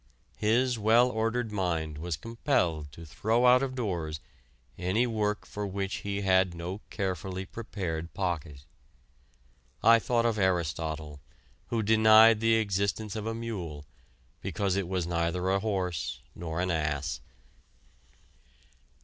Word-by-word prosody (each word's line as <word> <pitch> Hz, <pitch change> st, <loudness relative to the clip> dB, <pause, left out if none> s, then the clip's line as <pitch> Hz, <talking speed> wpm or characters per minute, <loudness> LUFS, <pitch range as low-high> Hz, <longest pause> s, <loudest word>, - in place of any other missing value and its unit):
His 120 Hz, +3 st, +2 dB
well 115 Hz, +4 st, +5 dB
ordered 115 Hz, +1 st, -1 dB
mind 80 Hz, -6 st, -2 dB
was 85 Hz, -1 st, -3 dB
compelled 90 Hz, -, -1 dB
to 85 Hz, -, -10 dB
throw 110 Hz, +10 st, +1 dB
out 125 Hz, +1 st, +7 dB
of 135 Hz, -1 st, -2 dB
doors 85 Hz, -, -3 dB, 0.6 s
any 95 Hz, +7 st, +1 dB
work 105 Hz, -3 st, -1 dB
for 105 Hz, 0 st, -4 dB
which 95 Hz, 0 st, -3 dB
he 100 Hz, 0 st, -3 dB
had 95 Hz, -2 st, +3 dB
no 90 Hz, +4 st, -5 dB
carefully 95 Hz, 0 st, -3 dB
prepared 85 Hz, -7 st, -5 dB
pocket. 75 Hz, -7 st, -3 dB, 1.2 s
I 115 Hz, 0 st, +7 dB
thought 120 Hz, 0 st, +1 dB
of 115 Hz, -2 st, +1 dB
Aristotle, 80 Hz, -5 st, -1 dB, 0.5 s
who 115 Hz, -2 st, -1 dB
denied 110 Hz, +1 st, +7 dB
the 115 Hz, 0 st, +3 dB
existence 100 Hz, 0 st, -1 dB
of 110 Hz, 0 st, -4 dB
a 115 Hz, -, -2 dB
mule 90 Hz, -11 st, -5 dB, 0.6 s
because 100 Hz, -3 st, -1 dB
it 100 Hz, -3 st, -1 dB
was 90 Hz, -2 st, -1 dB
neither 85 Hz, +2 st, 0 dB
a 100 Hz, -, +2 dB
horse 95 Hz, -5 st, -2 dB
nor 80 Hz, -1 st, -5 dB
an 90 Hz, 0 st, 0 dB
ass. 75 Hz, -3 st, -1 dB
95 Hz, 130 wpm, -29 LUFS, 85-110 Hz, 1.2 s, out